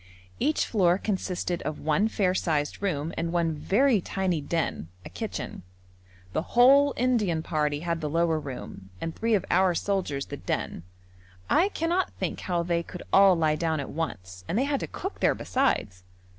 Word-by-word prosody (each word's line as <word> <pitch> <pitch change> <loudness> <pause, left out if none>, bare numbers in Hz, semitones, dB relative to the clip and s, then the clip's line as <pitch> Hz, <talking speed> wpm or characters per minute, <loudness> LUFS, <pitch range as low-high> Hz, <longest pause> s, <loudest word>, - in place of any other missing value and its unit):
Each 295 +4 +1
floor 180 -5 +3
consisted 185 -4 -2
of 150 +1 -4
one 160 +8 +2
fair 195 -4 +1
sized 155 -4 -1
room 165 -5 -1
and 165 0 -1
one 170 -2 +1
very 215 - +2
tiny 185 -3 -1
den, 160 - -2 0.2
a - - -7
kitchen. - - -5 0.7
The - - +1 0.2
whole 275 +3 +6
Indian 215 -10 +1
party 150 -2 -1
had 170 -1 -2
the 150 - -2
lower 165 0 +1
room, 125 -9 -8
and 165 - -4
three 225 -1 +1
of 195 - -1
our 185 0 +4
soldiers 170 -9 -1
the 145 - -7
den. - - -3 0.7
I 375 +4 +4
cannot 350 0 -1
think - - -3
how 175 -2 -1
they 170 0 0
could 180 +1 -9
all 195 -1 +7
lie 155 -2 +2
down 160 -1 -1
at 140 - -5
once, 95 - -5
and 190 - -1
they 255 - +3
had 280 -1 0
to - - -4
cook 385 +3 -6
there - - +3
besides. 180 - 0
175 Hz, 175 wpm, -27 LUFS, 155-210 Hz, 0.7 s, all